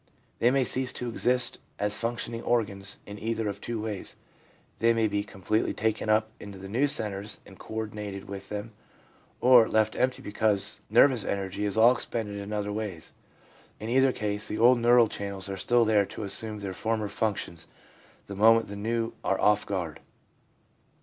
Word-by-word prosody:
They 120 - +4
may 135 +1 +3
cease 130 0 +1
to 125 - -4
exist 125 +2 +1 0.2
as 105 0 -1
functioning 115 0 -3
organs 100 -4 0
in 100 0 -9
either 110 0 -2
of 100 - -4
two 115 -1 -3
ways; 105 -3 -5 0.6
they 115 0 +4
may 115 -1 +2
be 100 -1 -1
completely 100 +2 -1
taken 110 0 -1
up 110 0 +2
into 100 -1 -9
the 95 +1 -9
new 125 +8 +1
centres 105 -5 -4
and 95 - -15
co 110 - -9
ordinated 105 -3 -5
with 100 0 -8
them, 105 +2 -5 0.7
or 125 -2 +7
left 110 0 +2
empty 130 0 0
because 105 -1 0
nervous 120 +1 +5
energy 100 +1 -2
is 100 +1 -1
all 115 +2 +7
expended 110 -4 -3
in 100 +1 -6
other 105 -1 -2
ways. 105 -6 -5 0.7
In 110 - -5
either 130 +2 +4
case, 105 -3 -3
the 105 - -3
old 120 +2 +6
neural 120 0 +5
channels 100 -2 -5
are 95 - -3
still 120 +4 +2
there 105 -2 +3
to - - -7
assume 105 +2 -3
their 100 -2 -5
former 110 +2 -1
functions 100 -6 -3 0.6
the 100 - -8
moment 115 +2 +5
the 100 - -6
new 115 +2 -2
are 95 - 0
off 105 0 +3
guard. 90 -6 -3
110 Hz, 175 wpm, -28 LUFS, 100-115 Hz, 0.7 s, or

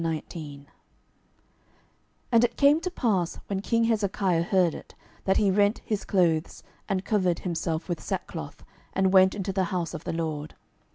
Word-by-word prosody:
12:019:001 155 -3 -5 1.7
And 230 -1 +5
it 240 -1 0
came 290 +3 +5
to 365 - -2
pass, 200 - 0
when 195 -1 -3
king 230 +3 +1
Hezekiah 200 -6 +1
heard 175 -1 +2
it, - - -11 0.3
that 190 - +3
he 200 -2 +3
rent 205 +2 +2
his 210 -2 -2
clothes, 170 -5 +1 0.3
and 195 -1 -1
covered 185 -5 +1
himself 165 -2 -2
with 175 -3 -3
sackcloth, - - -5 0.3
and 190 0 +2
went 190 0 +6
into 195 -1 -3
the 190 -1 +1
house 175 -2 -3
of 165 - -6
the - - -2
LORD. 155 -2 -4
185 Hz, 160 wpm, -27 LUFS, 165-205 Hz, 1.7 s, went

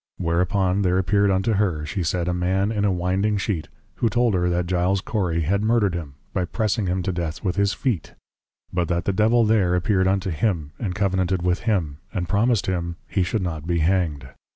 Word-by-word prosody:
Whereupon 90 +3 +1
there 90 -1 +2
appeared 100 +2 +2
unto 95 +4 +1
her 90 -7 0
(she 75 +5 -3
said) 85 +1 -1
a 90 - +1
man 95 +3 0
in 105 -2 0
a 100 - +3
Winding 95 +4 0
Sheet, 95 -6 -2 0.3
who 115 - +2
told 120 -1 +2
her 90 -1 +1
that 90 0 0
Giles 90 +2 +1
Cory 90 -5 -1
had 100 +6 +1
Murdered 110 -3 +2
him, 80 -6 -5 0.2
by 90 - 0
Pressing 110 +2 -1
him 90 +1 -1
to 95 - -1
Death 85 -3 -4
with 90 -3 0
his 100 0 +2
Feet; 115 - -2 0.6
but 90 -2 0
that 85 -1 -1
the 100 - +1
Devil 110 +4 +3
there 100 -5 +3
appeared 95 +1 +2
unto 95 -1 0
him, 80 -3 -1
and 95 -6 -3
Covenanted 95 -2 0
with 90 +1 +1
him, 80 -9 0
and 90 -4 -3
promised 110 +2 +2
him, 85 -3 -2 0.2
_He 95 - +2
should 95 +3 -1
not 80 -3 -4
be 85 -1 +1
Hanged. 80 -5 0
95 Hz, 205 wpm, -23 LUFS, 85-100 Hz, 0.6 s, a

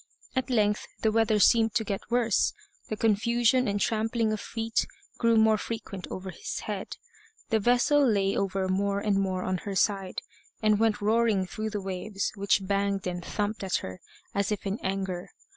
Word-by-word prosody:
At 260 +1 -1
length 210 -4 +1 0.2
the 220 - +3
weather 225 -1 +3
seemed 225 +2 +4
to 225 - +2
get 200 -2 -4
worse. 235 -3 +2 0.4
The 215 - -3
confusion 235 +3 +2
and 205 0 0
trampling 225 +1 0
of 215 - -3
feet 225 0 -1 0.3
grew 230 -1 +4
more 220 -1 +4
frequent 205 -5 -6
over 190 0 -6
his 440 - -5
head; - - -5 0.5
the 220 -2 +3
vessel 245 +6 +4
lay 200 -6 +2
over 195 -1 0
more 200 +1 0
and 200 -1 +1
more 185 -1 -1
on 185 -1 -1
her 200 +1 -5
side, 195 -1 0 0.4
and 215 -1 +3
went 220 -2 +2
roaring 215 -2 +2
through 215 +4 -4
the 205 -1 -4
waves, 195 +1 -3
which 200 -1 +1
banged 200 0 0
and 180 -1 -3
thumped 210 +2 -2
at 190 - 0
her 95 0 -8 0.3
as 200 0 0
if 210 -2 -3
in 195 +2 -2
anger. 190 -2 -3
210 Hz, 175 wpm, -28 LUFS, 195-225 Hz, 0.5 s, seemed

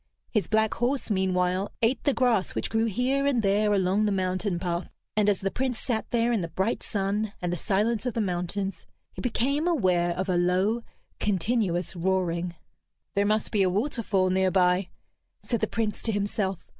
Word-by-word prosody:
His 210 -8 +1
black 220 0 +2
horse, 245 0 -1
meanwhile, 185 0 +1
ate 235 +2 +1
the 285 - +3
grass 235 -7 +2
which - - -2
grew 225 0 +2
here 255 +6 +1
and 250 -5 +2
there 205 +1 +3
along 195 +1 +2
the - - +1
mountain 185 0 0
path. 175 0 -3 0.3
And 210 -1 +3
as 200 - +1
the 195 0 -1
Prince 255 0 -1
sat 225 -2 -2
there 235 0 +2
in 225 -4 +1
the 170 - -2
bright 190 +7 -1
sun 200 +1 -1
and 175 -1 -2
the - - -2
silence 215 +7 0
of 245 - -2
the - - 0
mountains, 185 -1 -2 0.3
he - - -7
became 280 +6 0
aware 180 - +2
of 185 +1 -1
a 180 -2 +1
low, 185 +6 +2 0.4
continuous 190 -3 0
roaring. 175 -1 0 0.6
"There 200 0 +2
must 215 0 +1
be 205 - +2
a 185 - +4
waterfall 205 -3 0
near 190 0 +3
by," 180 0 +2 0.5
said 235 - -1
the - - 0
Prince 220 -2 -2
to 225 - -1
himself. 200 -2 -2
200 Hz, 185 wpm, -27 LUFS, 185-225 Hz, 0.6 s, a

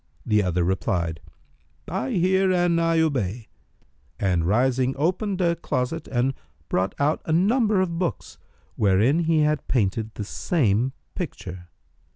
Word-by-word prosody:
The 105 -1 +3
other 90 -2 0
replied, 85 -3 -1 0.7
"I 190 +9 -2
hear 190 0 +3
and 175 -2 +2
I 165 0 +2
obey," 120 - -1 0.7
and 90 -4 +1
rising, 130 +5 +2
opened 185 +5 0
a 170 -1 +2
closet 155 0 -3
and 130 +1 0 0.4
brought 95 +1 0
out 145 +2 +1
a - - -2
number 210 +5 +3
of 170 -3 -2
books, 175 - -3 0.4
wherein 105 - +3
he 160 -1 +3
had 150 0 0
painted 110 -2 0
the 105 - -4
same 125 - 0 0.2
picture. 90 - -6
135 Hz, 135 wpm, -24 LUFS, 105-170 Hz, 0.7 s, The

